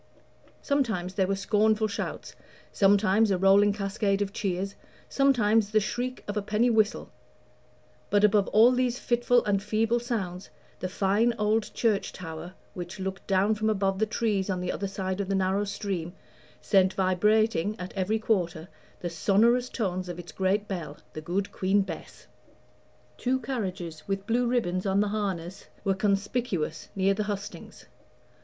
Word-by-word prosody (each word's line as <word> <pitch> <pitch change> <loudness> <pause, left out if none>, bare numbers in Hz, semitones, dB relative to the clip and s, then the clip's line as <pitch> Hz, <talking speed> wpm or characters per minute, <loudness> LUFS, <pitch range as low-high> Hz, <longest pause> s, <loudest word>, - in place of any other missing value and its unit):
Sometimes 220 -11 0
there 190 -1 +1
were 195 - 0
scornful 215 +2 +2
shouts, 200 - -5 0.4
sometimes 205 +2 +4
a 190 - +2
rolling 195 +2 +5
cascade 200 0 -1
of 200 0 -7
cheers, 195 0 -2 0.3
sometimes 225 -6 +3
the 215 0 +3
shriek 245 +4 -3
of 205 - -3
a 210 - 0
penny 215 +4 +1
whistle; 215 -1 +1 1.0
but 205 0 +3
above 210 -1 +4
all 225 +4 +6
these 250 -1 +1
fitful 240 0 +2
and 200 -2 +1
feeble 220 +3 +1
sounds, 195 -7 -4 0.3
the 185 - -3
fine 205 +5 +1
old 210 +1 +1
church 220 -4 +1
tower, 170 +1 -8 0.2
which 175 +2 -7
looked 190 0 -5
down 195 +2 +3
from 215 +1 0
above 195 -2 0
the 220 - +2
trees 210 -3 -1
on 185 -1 -1
the 180 0 -2
other 200 - -3
side 190 0 -3
of 195 - -4
the 195 - +1
narrow 190 +2 +1
stream, 195 -4 -4 0.5
sent 190 -2 +3
vibrating, 210 +1 +2
at 180 0 -6
every 195 +3 0
quarter, 180 -7 -1 0.3
the 175 - -2
sonorous 230 +8 +3
tones 185 -5 -2
of 175 - -5
its 175 -2 -9
great 195 +4 0
bell, 165 -6 -5 0.2
the 155 - -6
Good 185 +5 -2
Queen 195 +2 +2
Bess. - - -9 0.9
Two 260 +1 +1
carriages, 190 - -5
with 195 0 -2
blue 240 +2 +1
ribbons 195 -6 0
on 195 +1 +2
the 205 0 +2
harness, 195 -4 -4 0.2
were 195 - +2
conspicuous 195 -4 -1
near 195 0 +2
the 210 +1 -2
hustings. 205 -1 -6
200 Hz, 160 wpm, -27 LUFS, 190-220 Hz, 1.0 s, all